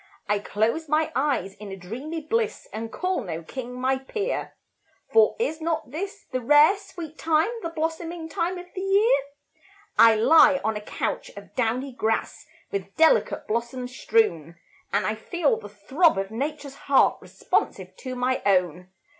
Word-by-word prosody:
I 210 Hz, 0 st, +1 dB
close 230 Hz, +10 st, -1 dB
my 310 Hz, +1 st, +2 dB
eyes 265 Hz, -9 st, 0 dB
in 205 Hz, 0 st, -10 dB
a -, -, -5 dB
dreamy 255 Hz, -, -6 dB
bliss, 445 Hz, +8 st, -1 dB
And 225 Hz, +1 st, -5 dB
call 365 Hz, -4 st, -1 dB
no 165 Hz, -3 st, -5 dB
king 250 Hz, +6 st, -7 dB
my 260 Hz, +1 st, +1 dB
peer; 420 Hz, -, -3 dB, 0.6 s
For 450 Hz, 0 st, +5 dB
is 390 Hz, -9 st, -2 dB
not 315 Hz, -5 st, -2 dB
this 395 Hz, +7 st, -6 dB
the 255 Hz, -1 st, -1 dB
rare, 295 Hz, -, +6 dB
sweet 345 Hz, -6 st, -10 dB
time, 325 Hz, +6 st, +2 dB
The 335 Hz, -, -3 dB
blossoming 325 Hz, +1 st, -3 dB
time 340 Hz, +3 st, -2 dB
of 355 Hz, -, -8 dB
the 375 Hz, -, -5 dB
year? 400 Hz, +4 st, +4 dB, 0.8 s
I 225 Hz, -1 st, +8 dB
lie 280 Hz, +4 st, +6 dB
on 220 Hz, 0 st, 0 dB
a 210 Hz, -, -4 dB
couch 210 Hz, 0 st, -3 dB
of 200 Hz, -, -11 dB
downy 250 Hz, +3 st, -1 dB
grass, 225 Hz, -2 st, -2 dB, 0.2 s
With 400 Hz, -1 st, -4 dB
delicate 320 Hz, +9 st, +3 dB
blossoms 245 Hz, +3 st, -3 dB
strewn, 170 Hz, -, +1 dB, 0.4 s
And 200 Hz, -1 st, +1 dB
I 215 Hz, -, 0 dB
feel 285 Hz, +4 st, 0 dB
the 205 Hz, -, -10 dB
throb 265 Hz, -, +2 dB
of 195 Hz, +1 st, -2 dB
Nature's 285 Hz, +4 st, -4 dB, 0.2 s
heart 275 Hz, -, +4 dB
Responsive -, -, -2 dB
to 255 Hz, -2 st, -6 dB
my 255 Hz, +1 st, 0 dB
own. 180 Hz, -2 st, +1 dB
270 Hz, 165 wpm, -25 LUFS, 220-330 Hz, 0.8 s, I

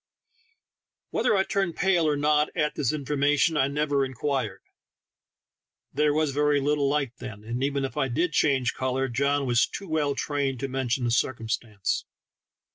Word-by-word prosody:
Whether -, -, +2 dB
I 190 Hz, -, +3 dB
turned 195 Hz, -4 st, -1 dB
pale 175 Hz, -4 st, +2 dB
or 150 Hz, -1 st, +1 dB
not 150 Hz, +1 st, +2 dB
at 150 Hz, -1 st, +1 dB
this 135 Hz, -5 st, 0 dB
information 150 Hz, +2 st, +1 dB
I 135 Hz, -2 st, +3 dB
never 145 Hz, -1 st, 0 dB
inquired; 130 Hz, -6 st, -2 dB, 1.3 s
there 150 Hz, +2 st, +2 dB
was 155 Hz, -1 st, +1 dB
very 145 Hz, +1 st, +2 dB
little 145 Hz, 0 st, +1 dB
light 140 Hz, -4 st, 0 dB
then, 110 Hz, -4 st, -8 dB
and 120 Hz, +4 st, -3 dB
even 140 Hz, 0 st, 0 dB
if 135 Hz, -, -6 dB
I 135 Hz, -2 st, +1 dB
did 160 Hz, +8 st, 0 dB
change 135 Hz, -5 st, +2 dB
color, 130 Hz, +1 st, -1 dB
John 140 Hz, +3 st, +1 dB
was 120 Hz, -2 st, +3 dB
too 195 Hz, -, -7 dB
well 150 Hz, -3 st, 0 dB
trained 140 Hz, -3 st, -1 dB
to 135 Hz, -, -1 dB
mention 130 Hz, -1 st, -1 dB
the 120 Hz, -, 0 dB
circumstance. 115 Hz, -4 st, -1 dB
140 Hz, 160 wpm, -26 LUFS, 130-150 Hz, 1.3 s, I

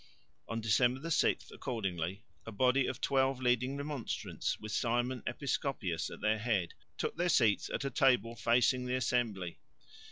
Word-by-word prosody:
On 115 Hz, -, -3 dB
December 125 Hz, +6 st, +2 dB
6 -, -, +1 dB
accordingly, 95 Hz, -4 st, -3 dB, 0.2 s
a -, -, -4 dB
body 125 Hz, +5 st, +3 dB
of -, -, -4 dB
twelve 135 Hz, -1 st, +2 dB
leading 125 Hz, +2 st, +1 dB
Remonstrants 145 Hz, -4 st, -3 dB
with 110 Hz, 0 st, -7 dB
Simon 120 Hz, +2 st, 0 dB
Episcopius 120 Hz, -, -2 dB
at -, -, -10 dB
their 110 Hz, 0 st, +2 dB
head 105 Hz, -6 st, 0 dB, 0.2 s
took -, -, -2 dB
their 175 Hz, +1 st, +1 dB
seats 115 Hz, -10 st, +3 dB
at -, -, -3 dB
a 140 Hz, -, -1 dB
table 125 Hz, -6 st, +3 dB
facing 125 Hz, +2 st, +2 dB
the 125 Hz, -, 0 dB
assembly. 110 Hz, -8 st, -1 dB
120 Hz, 150 wpm, -33 LUFS, 110-130 Hz, 0.2 s, body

